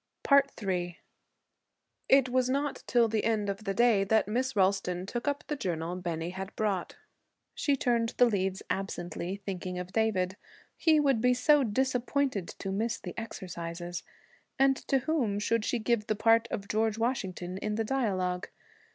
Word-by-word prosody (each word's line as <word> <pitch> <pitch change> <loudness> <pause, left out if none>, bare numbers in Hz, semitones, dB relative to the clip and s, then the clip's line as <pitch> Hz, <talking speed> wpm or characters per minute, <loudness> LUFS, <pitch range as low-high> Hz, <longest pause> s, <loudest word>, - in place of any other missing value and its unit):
III 175 -3 -2 1.1
It 270 -1 +6
was 255 0 +2
not 280 +2 -1
till 240 -2 +4
the 220 -1 0
end 215 -3 +1
of 200 +2 -8
the 195 - 0
day 235 -4 +4
that 220 +2 +2
Miss 255 +4 -1
Ralston 185 -2 +1
took 240 +6 -4
up 285 0 0
the 300 - -2
journal 175 - -3
Bennie 170 -2 -3
had 190 +2 -7
brought. 200 -5 -1 0.6
She 285 - +1
turned 235 -3 0
the 245 - +7
leaves 190 -4 -1
absently, 190 0 -4
thinking 185 -2 -4
of 180 +1 -6
David. 205 -4 +1 0.4
He 315 -2 +4
would 275 -6 +2
be 250 +1 +4
so 290 +3 +4
disappointed 255 -2 0
to 195 - -6
miss 225 +4 -1
the 180 - -7
exercises! 175 -5 -6 0.6
And 270 0 +4
to 270 - +3
whom 255 -8 0
should 220 +2 +1
she 245 - 0
give 230 -1 0
the 215 - +1
part 225 +2 +4
of 200 -1 -4
George 220 +1 +1
Washington 190 -6 -2
in 210 +1 -2
the 225 - 0
dialogue? 190 -8 -1
215 Hz, 160 wpm, -30 LUFS, 185-245 Hz, 1.1 s, the